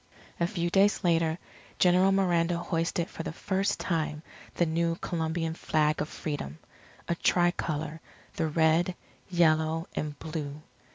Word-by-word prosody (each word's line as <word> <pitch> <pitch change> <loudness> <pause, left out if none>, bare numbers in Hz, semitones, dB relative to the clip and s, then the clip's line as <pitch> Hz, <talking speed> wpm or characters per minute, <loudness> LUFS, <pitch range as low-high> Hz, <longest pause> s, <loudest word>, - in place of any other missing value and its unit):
A 170 - +2
few 175 -2 -2
days 200 +2 +3
later 165 -2 +2 0.4
General 185 +1 +5
Miranda 175 -3 +2
hoisted 170 0 -1
for - - -7
the - - -4
first 195 +4 -1
time 155 -3 -1 0.3
the 175 - +3
new 165 +1 0
Colombian 165 -1 -2
flag 155 -2 +1
of 150 - -3
Freedom 145 - -5 0.5
a - - +1
tri 175 +1 +3
colour, 155 -2 -4 0.3
the 160 - 0
Red, 160 +3 +2 0.3
Yellow, 160 -2 +2
and 150 -1 -3
Blue. 155 -2 -5
165 Hz, 135 wpm, -29 LUFS, 155-175 Hz, 0.5 s, General